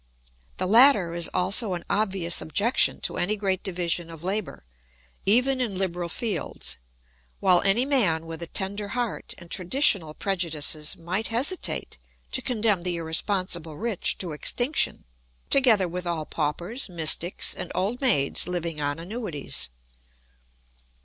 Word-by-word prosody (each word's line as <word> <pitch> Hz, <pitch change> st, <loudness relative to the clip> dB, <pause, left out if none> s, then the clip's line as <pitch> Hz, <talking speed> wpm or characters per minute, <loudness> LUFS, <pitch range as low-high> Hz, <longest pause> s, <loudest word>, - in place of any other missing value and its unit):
The 185 Hz, -, -1 dB
latter 215 Hz, -4 st, +6 dB
is 170 Hz, 0 st, +2 dB
also 190 Hz, +2 st, +2 dB
an 175 Hz, -, -7 dB
obvious 195 Hz, -5 st, 0 dB
objection 210 Hz, +9 st, +1 dB
to -, -, -2 dB
any 205 Hz, +4 st, 0 dB
great 195 Hz, -3 st, -1 dB
division 175 Hz, -2 st, -2 dB
of 165 Hz, -1 st, -11 dB
labour, 195 Hz, -, -3 dB, 0.6 s
even 255 Hz, +5 st, +3 dB
in 215 Hz, -7 st, -2 dB
liberal 175 Hz, -2 st, -2 dB
fields; 225 Hz, +3 st, -2 dB, 0.6 s
while 185 Hz, -3 st, +4 dB
any 200 Hz, +6 st, +3 dB
man 195 Hz, -, +2 dB
with 165 Hz, 0 st, -8 dB
a 170 Hz, -, -4 dB
tender 200 Hz, +4 st, -3 dB
heart 240 Hz, -3 st, -3 dB
and 170 Hz, -1 st, -14 dB
traditional 180 Hz, -, +2 dB
prejudices 160 Hz, -5 st, 0 dB
might 180 Hz, +6 st, -3 dB
hesitate 265 Hz, +11 st, -2 dB, 0.3 s
to 260 Hz, -, +2 dB
condemn 220 Hz, -7 st, +2 dB
the 175 Hz, 0 st, -2 dB
irresponsible 170 Hz, -1 st, -1 dB
rich 225 Hz, -3 st, 0 dB
to 180 Hz, -3 st, -3 dB
extinction, 245 Hz, -, 0 dB, 0.5 s
together 230 Hz, -9 st, +5 dB
with 180 Hz, +1 st, -5 dB
all 165 Hz, -3 st, -2 dB
paupers, 175 Hz, -, -2 dB
mystics, 170 Hz, +1 st, +2 dB
and -, -, -5 dB
old 215 Hz, +8 st, -1 dB
maids 180 Hz, -, +2 dB
living 170 Hz, -3 st, -3 dB
on 145 Hz, 0 st, -1 dB
annuities. 170 Hz, -, -4 dB
185 Hz, 135 wpm, -25 LUFS, 170-220 Hz, 0.6 s, latter